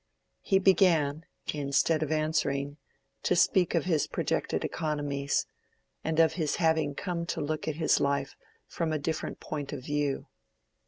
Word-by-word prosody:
He 195 - +3
began, 165 -6 +3 0.3
instead 145 +2 +1
of 155 -1 -1
answering, 145 -2 0 0.4
to - - +2
speak 180 -2 +3
of 170 - +1
his 160 -5 +1
projected - - -1
economies, 145 -3 -1 0.6
and 160 0 0
of 160 -1 +5
his 160 -3 -1
having 160 -3 +1
come 175 -2 -3
to - - -2
look 155 +1 -2
at 155 - -1
his 160 0 +3
life 140 0 0 0.3
from 165 -2 -2
a 155 - +1
different 155 +2 -3
point 145 -3 -5
of 140 -3 -6
view. 145 -2 -1
155 Hz, 150 wpm, -29 LUFS, 145-165 Hz, 0.6 s, of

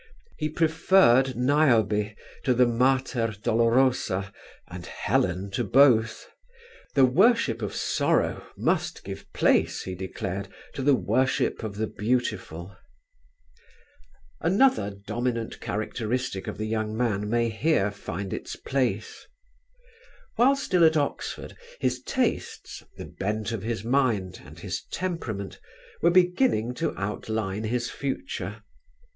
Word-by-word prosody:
He 155 0 -2
preferred 155 -5 +4
Niobe 115 -6 +2 0.3
to 125 - +2
the 125 +1 +5
Mater 120 -2 +1
Dolorosa 115 -4 +2 0.3
and 90 0 -9
Helen 90 +2 -1
to 120 - -1
both; 115 0 +4 0.7
the 135 -2 +7
worship 150 - +3
of 105 - -4
sorrow - - +1
must - - -1
give - - -8
place, - - +2
he 95 - -5
declared, 95 +1 -5 0.3
to - - -4
the 140 +1 +4
worship 125 +5 0
of 110 -3 -5
the 110 +1 -1
beautiful. 105 -6 -2 1.6
Another 190 - +3 0.2
dominant 115 +1 -2
characteristic 110 0 -3
of - - -5
the 110 - -3
young 110 0 -2
man 105 -4 0
may 120 +1 +1
here 110 -3 +1
find 100 -1 -6
its - - -5
place. 120 -6 -2 1.1
While 260 +4 +5
still 180 -10 +1
at 160 -1 +5
Oxford 145 -1 -3 0.2
his - - 0
tastes 255 -3 -2 0.2
the - - -7
bent 105 +2 -3
of 115 -4 -3
his 110 -1 -3
mind, 115 -7 0
and - - -13
his - - -4
temperament 120 - -4 0.4
were 170 - +5
beginning 180 - +3
to 165 +6 -3
outline 105 +1 -3
his 120 +2 -1
future. 140 - -4
115 Hz, 120 wpm, -26 LUFS, 105-135 Hz, 1.6 s, the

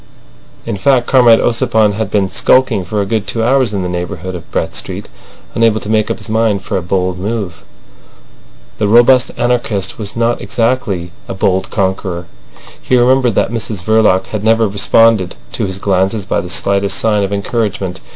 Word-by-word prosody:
In 115 -3 -3
fact, 125 +3 +2
Comrade 120 -4 +5
Ossipon 110 -3 +2
had 110 0 -3
been 100 -2 +1
skulking 115 -1 +2
for 105 +4 -2
a - - -1
good 110 0 -2
two 115 - -2
hours 130 -1 +2
in 100 -3 -2
the - - -2
neighbourhood 90 +1 -5
of 85 -2 -9
Brett - - -3
Street, - - -5 0.5
unable 115 -1 +2
to 105 - -5
make 110 -1 +1
up - - -2
his - - -9
mind 110 -3 0
for 100 - -4
a 95 - 0
bold 90 0 -1
move. 100 -3 -4 1.2
The 105 - +1
robust 120 +4 +5
anarchist 115 -6 -1
was 105 -2 -6
not 115 +1 0
exactly 115 -8 -1 0.2
a - - -5
bold 95 0 0
conqueror. 95 -3 -2 0.6
He 130 - +1
remembered 125 -2 +3
that - - +1
Mrs 110 -4 -4
Verloc 105 -3 +3
had 110 -2 -5
never 115 0 +3
responded 100 -1 +2 0.2
to - - -2
his 95 0 -4
glances 95 +1 0
by - - -1
the 90 - -8
slightest 100 +2 0
sign 105 -2 +1
of 100 0 -2
encouragement. 100 -3 -2
105 Hz, 180 wpm, -14 LUFS, 95-115 Hz, 1.2 s, Comrade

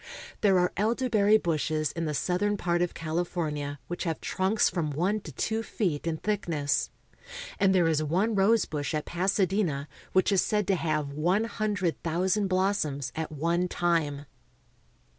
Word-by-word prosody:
There 195 -3 +4
are 180 0 +2
elderberry 215 -1 +3
bushes 155 -4 -1
in 165 0 -3
the 150 -1 -2
southern 205 +6 0
part 175 -2 0
of 175 - -1
California 155 -3 -2
which 175 - -4
have 165 -2 -2
trunks 190 +3 +1
from 170 -4 -1
one 180 +9 0
to 165 - -10
two 220 - -1
feet 175 -9 -2
in 160 -1 -1
thickness; 165 -8 -1 0.7
and 195 -1 +4
there 175 -3 +4
is 155 -2 +2
one 185 +9 +1
rose 210 +2 +3
bush 145 -1 -3
at 150 - -2
Pasadena 185 -5 0 0.2
which 185 +2 +3
is 195 - +4
said 210 -2 0
to 195 - +4
have 155 -4 -1
one 175 +9 +1
hundred 210 -6 -2
thousand 185 +5 +1
blossoms 185 -8 0
at 160 0 -3
one 170 +4 0
time. 160 -5 0
175 Hz, 160 wpm, -28 LUFS, 155-200 Hz, 0.7 s, There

